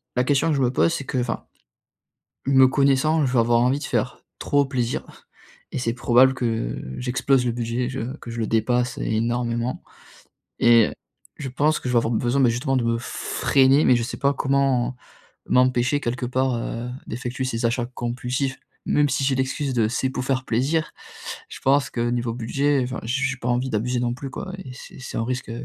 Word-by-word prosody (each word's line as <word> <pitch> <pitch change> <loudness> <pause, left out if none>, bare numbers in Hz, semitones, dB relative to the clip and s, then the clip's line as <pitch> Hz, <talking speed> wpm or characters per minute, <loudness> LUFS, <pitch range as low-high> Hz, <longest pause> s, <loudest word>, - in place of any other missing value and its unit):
la 125 - +2
question 145 +4 +2
que 155 - +2
je 140 - 0
me 125 -1 +2
pose, 165 +5 +2
c'est 140 - -4
que, 130 - -3
enfin, 120 -2 -2 1.0
me 130 -1 +6
connaissant 140 +3 +3
je 130 - -1
vais 125 - +3
avoir 115 0 +3
envie 130 +3 +2
de - - -8
faire - - -2 0.2
trop 145 0 +2
plaisir 125 -3 -2 0.7
et - - -3
c'est 115 -2 -1
probable 125 +2 +4
que 115 - -2 0.2
j'explose 125 +1 +1
le 120 - +1
budget, 120 +1 -2
je 130 +1 -5
que 120 - -9
je 115 - -5
le 110 - -1
dépasse 120 +3 +1
énormément. 120 +2 -1 0.8
Et 115 -2 +6 0.5
je 140 -3 -5
pense 150 +4 +1
que 125 - -4
je - - -1
vais - - +4
avoir 115 0 +1
besoin 120 +4 +1
mais 125 - +5
justement 130 +3 0
de 125 - +1
me 115 0 +1
freiner 135 +4 +2
mais 125 - +6
je 120 - -1
sais 120 - -5
pas 140 0 +2
comment 135 -2 +1 0.5
m'empêcher 125 +2 +3
quelque 125 -2 -3
part, 130 +1 0
heu, 115 +1 -4 0.2
d'effectuer 125 +2 -4
ces 115 -2 -2
achats 120 +1 0
compulsifs? 125 +2 -3 0.3
Même 145 0 +3
si 135 +1 0
j'ai 135 0 +2
l'excuse 135 +1 -1
de 115 -3 +2
c'est 120 +4 -1
pour 130 -1 -4
faire 130 -1 0
plaisir, 145 +7 0 0.6
je - - -9
pense 135 +1 +3
que 120 - -3
niveau 120 -1 -1
budget, 135 +4 0
enfin, 125 +1 -4
j 130 +5 -1
j'ai 135 0 -1
pas 120 - -5
envie 125 +2 0
d'abuser 120 +2 -1
non 120 -1 0
plus 135 +2 -7
quoi 185 +7 -7
et 150 -9 -9
c'est 130 - -12
c'est 130 - -8
un 115 - 0
risque 125 -1 -3
125 Hz, 200 wpm, -23 LUFS, 120-135 Hz, 1.0 s, me